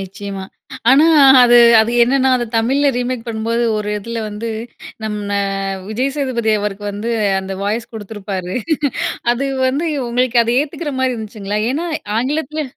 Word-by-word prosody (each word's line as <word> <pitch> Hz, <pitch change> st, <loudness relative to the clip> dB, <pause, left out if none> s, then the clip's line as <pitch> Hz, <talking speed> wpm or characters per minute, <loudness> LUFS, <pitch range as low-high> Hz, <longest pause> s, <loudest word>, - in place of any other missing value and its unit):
நிச்சயமா. 195 Hz, 0 st, -7 dB, 0.5 s
ஆனா, 285 Hz, +4 st, +6 dB, 0.4 s
அது 240 Hz, 0 st, +6 dB, 0.2 s
அது 220 Hz, +2 st, +1 dB
என்னென்னா 265 Hz, +2 st, +3 dB
அது 240 Hz, -, -2 dB
தமிழ்ல 270 Hz, +6 st, +2 dB
ரீமேக் 245 Hz, -1 st, -3 dB
பண்ணும் 220 Hz, -1 st, -4 dB
போது, 235 Hz, +1 st, +1 dB
ஒரு 210 Hz, -1 st, -3 dB
இதில 230 Hz, +3 st, -6 dB
வந்து 210 Hz, +2 st, -5 dB, 0.6 s
நம்ம 205 Hz, -1 st, -2 dB, 0.5 s
விஜய் 255 Hz, +6 st, -1 dB
சேதுபதி 245 Hz, -5 st, -1 dB
அவருக்கு 205 Hz, 0 st, -4 dB
வந்து, 215 Hz, +4 st, -4 dB, 0.3 s
அந்த 190 Hz, 0 st, -6 dB
வாய்ஸ் 225 Hz, +4 st, -2 dB
குடுத்துருப்பாரு. 200 Hz, -4 st, -6 dB, 0.8 s
அது 260 Hz, +3 st, -2 dB, 0.2 s
வந்து 290 Hz, +6 st, -1 dB, 0.2 s
உங்களுக்கு 245 Hz, 0 st, +1 dB
அத 230 Hz, -, -1 dB
ஏத்துக்கிறமாரி 275 Hz, -4 st, -2 dB
இருந்துச்சுங்களா? 210 Hz, -2 st, -4 dB
ஏன்னா, 325 Hz, +6 st, -2 dB, 0.3 s
ஆங்கிலத்துல 300 Hz, +4 st, -2 dB
230 Hz, 135 wpm, -17 LUFS, 210-260 Hz, 0.8 s, ஆனா